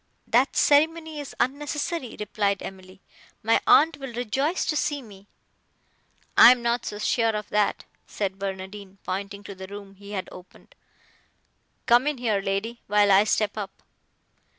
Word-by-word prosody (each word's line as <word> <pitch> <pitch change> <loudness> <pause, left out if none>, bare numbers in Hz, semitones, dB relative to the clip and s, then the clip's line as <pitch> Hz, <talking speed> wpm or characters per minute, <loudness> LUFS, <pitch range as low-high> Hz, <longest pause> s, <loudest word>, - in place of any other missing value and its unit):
"That 250 +4 +2
ceremony 315 +1 +3
is 285 - -8
unnecessary," 290 0 -2
replied 205 -1 -1
Emily, 190 0 -10 0.4
"my 225 +1 +3
aunt 315 0 +5
will 270 -2 -7
rejoice 270 - -1
to 310 - -1
see 290 -1 0
me." 205 -5 -14 1.1
"I - - +10
am 250 -1 +1
not 235 0 0
so 205 - -5
sure 225 +1 +1
of 210 -1 -5
that," 210 -1 +1 0.2
said 195 -2 -3
Barnardine, 195 0 -6
pointing 200 +2 -5
to 200 - -8
the 190 0 -9
room 200 0 -10
he 200 +1 -11
had 190 -2 -3
opened: 180 0 -15 1.1
"Come 240 +4 +4
in 295 -2 0
here, 220 -5 0
lady, 200 +5 -3
while 205 0 +4
I 195 +2 +6
step 215 -1 0
up." 195 -2 -8
210 Hz, 150 wpm, -25 LUFS, 200-260 Hz, 1.1 s, I